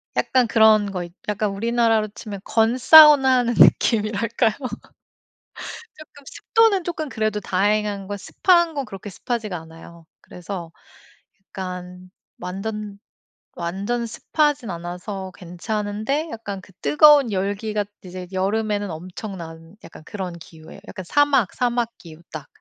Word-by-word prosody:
약간 255 -2 +2
그런 215 -2 +4
거 180 -2 -4
있 175 - -10 0.2
약간 210 0 -1
우리나라로 225 +1 +1
치면 205 -1 -9
건사우나 260 +5 +6
하는 240 -1 0
느낌이랄까요. 225 +1 +3 1.5
쪼끔 305 -2 -15
습도는 445 - +2
쪼금 315 -3 -4
그래도 215 -3 -2
다행한 205 +1 0
건 205 +1 -4
습한 345 - +2
건 280 -2 -2
그렇게 205 -1 -9
습하지가 215 -1 -4
않아요. 165 +1 -14
그래서 180 -1 -8 0.7
약간 180 -1 -8 0.3
완전 205 +2 -5 0.6
완전 195 +8 -3
습하진 295 +1 -1
않아서 180 +3 -6
괜찮은데 210 - -3
약간 205 -4 -6
그 190 - -18
뜨거운 295 -5 +6
열기가 205 +2 -2 0.2
이제 180 0 -8
여름에는 205 +2 -1
엄청난 170 -1 -9
약간 - - -13
그런 185 -2 -6
기후에요. 160 +2 -14
약간 190 - -8
사막, 280 -2 +2
사막 240 -1 -1
기후 165 -1 -14
딱. 150 -2 -8
210 Hz, 285 characters per minute, -22 LUFS, 185-235 Hz, 1.5 s, 건사우나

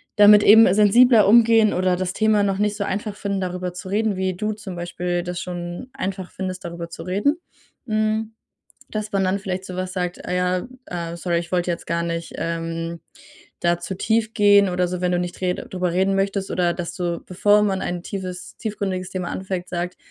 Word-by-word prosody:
damit 210 0 +8
eben 220 -1 +8
sensibler 215 +2 +6
umgehen 225 0 +6
oder 185 0 +1
das 185 0 -2
Thema 215 -1 +3
noch 195 -1 0
nicht 210 0 0
so 205 - -1
einfach 205 +1 -3
finden, 200 -1 -3
darüber 180 -1 -3
zu 180 +1 -8
reden, 210 +1 +1
wie 190 0 -1
du 215 +3 -2
zum 210 -3 -8
Beispiel 175 0 -3
das 180 0 -4
schon 175 +6 -6
einfach 190 -1 -4
findest, 185 -1 -5
darüber 170 0 -6
zu 165 - -8
reden. 205 - +1 0.5
Hm, 215 0 0 0.6
dass 215 -1 -4
man 195 -1 +1
dann 185 +2 +1
vielleicht 190 -1 -4
so 185 - -7
was 185 0 -3
sagt: 180 -1 -3
„Ah - - -2
ja, 180 +3 0 0.2
äh, 170 -1 -5
sorry, 170 0 -1
ich 170 0 -6
wollte 180 -1 +1
jetzt 170 - -4
gar 170 +1 -1
nicht, 170 0 -4
ähm, 165 0 -3 0.6
da 175 0 +2
zu 180 +2 -5
tief 220 +3 0
gehen“, 205 -2 +5
oder 180 0 +1
so, 180 0 -4
wenn 180 0 +1
du 175 - +1
nicht 175 0 -4
red 180 -1 -2
drüber 180 -2 -1
reden 190 +2 +2
möchtest, 195 0 -1
oder 175 -1 +1
dass 175 -2 -5
du, 175 -3 -2
bevor 205 +3 +3
man 195 -2 0
ein 175 -1 -3
tiefes 185 -1 -6
tiefgründiges 195 -4 -3
Thema 185 -2 -3
anfängt, 185 -1 -4
sagt: 180 0 -3
185 Hz, 205 wpm, -22 LUFS, 175-205 Hz, 0.6 s, damit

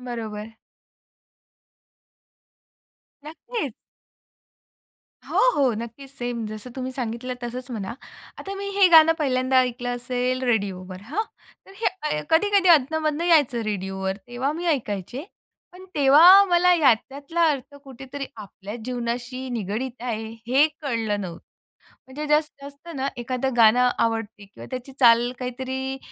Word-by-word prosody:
बरोबर. 225 -3 -6 2.7
नक्कीच. 325 - -5 1.6
हो, - - 0 0.2
हो, 270 -4 +3
नक्कीच. 235 +4 -8
सेम 245 -4 -4
जसं 215 +3 -8
तुम्ही 260 0 -4
सांगितलं 250 0 -4
तसंच 250 +2 -6
म्हणा. 215 -3 -4 0.5
आता 395 - -6
मी 400 0 -5
हे 390 - +8
गाणं 325 0 +8
पहिल्यांदा 260 -2 +2
ऐकलं 245 -1 0
असेल 250 +1 -2
रेडिओवर 195 -6 -2
हां. 305 - -2 0.4
तर 390 - -15
हे 330 - -1
कधी-कधी 390 +3 +3
अधनं-मधनं 310 +1 +3
यायचं 295 -8 +3
रेडिओवर 190 -2 -3
तेव्हा 245 +4 -2
मी 345 +2 -5
ऐकायचे. 245 - -2 0.5
पण 365 +1 -13
तेव्हा 320 +8 +8
मला 360 -1 +4
याच्यातला 280 +3 +1
अर्थ 285 -1 -5
कुठेतरी 270 +1 -8
आपल्या 205 0 -9
जीवनाशी 245 +1 -4
निगडित 235 +3 -4
आहे, 225 -3 -3 0.2
हे 270 +5 +5 0.2
कळलं 225 -7 -1
नव्हतं. 175 -3 -7 0.7
म्हणजे 285 +4 -6
जसं 300 -2 0
असतं 285 +4 -11
ना 270 0 -1
एखादं 255 +1 -2
गाणं 240 +2 +6
आवडते 225 -2 -2
किंवा 200 - -13
त्याची 255 +1 -6
चाल 240 0 +5
काहीतरी 260 +1 -4
255 Hz, 120 wpm, -24 LUFS, 230-290 Hz, 2.7 s, हे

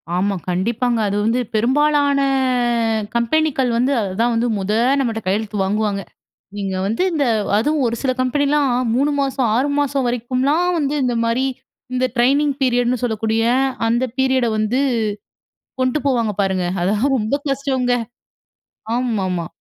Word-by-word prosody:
ஆமா. 195 +2 0
கண்டிப்பாங்க. 230 +6 0
அது 200 - -1
வந்து 230 +3 +1 0.2
பெரும்பாலான 285 +4 +2 1.0
கம்பெனிக்கள் 265 +2 +1
வந்து, 250 +4 +1
அதுதான் 215 +5 0
வந்து 230 +2 +1
மொத 195 +1 -2 0.3
நம்மட்ட 230 -4 -1
கையெழுத்து 210 +2 -1
வாங்குவாங்க. 205 0 -1 0.6
நீங்க 195 -2 -3
வந்து 225 - -1
இந்த 300 -3 +1 0.3
அதுவும் 295 +6 +1
ஒரு 230 - -1
சில 265 - +1
கம்பெனிலாம், 285 +1 +1 0.2
3 280 +4 +2
மாசம், 265 -2 0
6 265 +5 +1
மாசம் 280 -2 0
வரைக்கும்லாம் 255 +8 0
வந்து 285 -1 -1
இந்த 245 -1 0
மாரி, 235 +3 +1 0.5
இந்த 255 0 +1
ட்ரெய்னிங் 280 +4 +3
பீரியடுன்னு 245 -1 +1
சொல்லக்கூடிய 225 -1 0 0.5
அந்த 240 +2 +1
பீரியட 260 -2 +2
வந்து, 215 +5 0 1.0
கொண்டு 255 +3 +1
போவாங்க 235 -5 +1
பாருங்க. 190 -2 0 0.2
அதெல்லாம் 210 +9 +1
ரொம்ப 220 +4 0
கஷ்டங்க 265 -2 0 1.0
ஆமாமா. 195 -9 -1
245 Hz, 130 wpm, -19 LUFS, 220-275 Hz, 1.0 s, ட்ரெய்னிங்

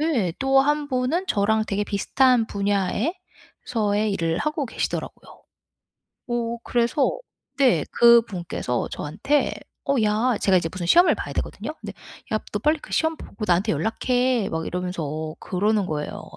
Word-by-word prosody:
네. 250 - +1
또 270 0 +4
1 295 +1 +1
분은 260 +8 0
저랑 215 +2 +2
되게 205 0 -1
비슷한 240 +4 +2
분야에서의 210 - -2
일을 165 -3 -1
하고 300 -2 -1
계시더라고요. - - -5 0.9
어 235 -1 -2
그래서 240 +4 +1 0.4
네. 245 - +4
그분께서 210 - +3
저한테 205 - -1 0.4
"어 280 - +3
야." 220 +3 +2
제가 190 -2 +3
이제 165 - -2
무슨 185 -2 -4
시험을 350 - +6
봐야 - - -5
하거든요. - - -4
근데 - - -7 0.4
"야, 215 - +2
너 205 - 0
빨리 305 +4 +2
그 - - -13
시험 320 0 +1
보고 215 -7 -8
나한테 185 +4 +2
연락해." 245 0 0
막 160 0 -3
이러면서 160 -4 -4
그러는 205 +2 0
거예요. 150 -3 -4
220 Hz, 305 characters per minute, -23 LUFS, 185-260 Hz, 0.9 s, 시험을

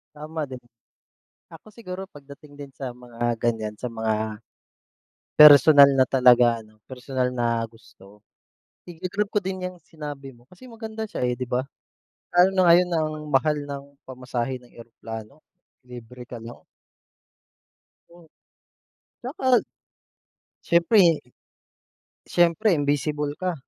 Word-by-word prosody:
Tama 155 0 -5
din. 130 -2 -10 0.9
Ako 165 - -14
siguro 195 -3 -9
pagdating 145 0 -15
din 140 -1 -10
sa 130 -2 -6
mga 120 -1 -4
ganyan, 110 -3 -2
sa 125 - -5
mga 110 -1 -3 0.9
personal 145 -1 +9
na 130 - +5
talaga 120 -3 +4
ano 110 0 -23
personal 130 0 -3
na 115 -1 0
gusto, 105 -2 -20 0.7
iga-grab 185 +4 -3
ko 210 - -2
din 190 -1 -5
yang 180 0 -7
sinabi 145 -4 -9
mo, 120 +1 -24
kasi 185 +8 -16
maganda 220 -2 -7
siya, - - -7
eh, 125 -1 -1
'di 125 - -4
ba? 125 +1 -1 0.7
Lalo 180 +2 +5
na 185 - +4
ngayon 180 +1 +4
ang 155 -1 0 0.2
mahal 150 +2 +1
ng 140 -1 -7 0.2
pamasahe 130 0 -4
ng 125 - -21
eroplano, 115 +3 -10 0.4
libre 125 0 -11
ka 120 -1 -10
lang. 115 +1 -11 1.5
Oo. 170 -1 -19 0.9
Tsaka 255 -1 +1 1.1
siyempre 170 -1 +4 1.1
siyempre 175 +4 +2
invisible 145 0 -1
ka. 185 -1 -2
140 Hz, 120 wpm, -24 LUFS, 120-170 Hz, 1.5 s, personal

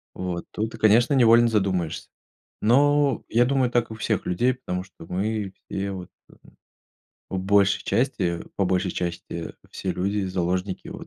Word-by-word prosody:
Вот, 90 -2 -4
тут, 110 +2 -3
и - - -10
конечно, 115 +5 +4
невольно 120 -2 +6
задумаешься. 95 -6 -1 0.5
Но 145 +4 +3
я 120 +2 +4
думаю, 130 -1 +2
так 120 -1 +1
и - - -4
у 110 - -9
всех 110 -2 -1
людей, 120 +9 +1
потому 90 -8 -4
что 95 -3 -14
мы 100 +3 -2 0.2
все 100 0 -3
вот, 95 -2 -7 1.2
в 95 - -3
большей 100 +1 +3
части, 115 -10 0
по 100 - +1
большей 90 0 0
части, 85 -1 -4 0.2
все - - -3
люди 100 +2 -1
заложники 90 +1 -2
вот, - - -7
100 Hz, 155 wpm, -24 LUFS, 90-120 Hz, 1.2 s, невольно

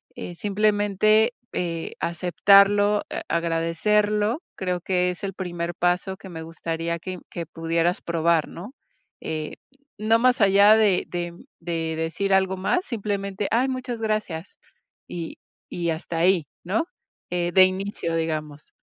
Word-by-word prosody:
eh, 175 - -7
simplemente, 210 +3 +2 0.2
eh, 165 -2 -3
aceptarlo, 200 +4 +4
eh, - - -4
agradecerlo, 205 - +1
creo 180 -2 -2
que 180 0 +1
es 180 - -10
el 195 -1 -3
primer 175 -2 -4
paso 180 +2 0
que 195 - -12
me 165 -2 -7
gustaría 165 +1 -3
que 185 +1 -6
que 170 - -5
pudieras 165 +2 -1
probar, 170 -1 +1
¿no? 200 +9 -9 0.5
Eh, 155 -1 -4 0.4
no 220 +2 +3
más 250 0 +3
allá 200 +2 +7
de 210 -4 +3
de 175 -1 -4 0.3
de 165 -1 -2
decir 165 +5 -1
algo 190 0 +2
más, 275 - 0
simplemente: 200 - -3
"Ay, 250 +4 +2
muchas 255 -2 -4
gracias". 215 -6 -3 0.5
Y, 170 -2 -6 0.3
y 170 -1 -1
hasta 165 +1 -4
ahí, 175 -2 +3 0.2
¿no? 200 - +1 0.5
Eh, 175 -1 0
de 190 - +8
inicio, 185 -3 -2
digamos. 155 -2 -4
185 Hz, 135 wpm, -24 LUFS, 170-205 Hz, 0.5 s, de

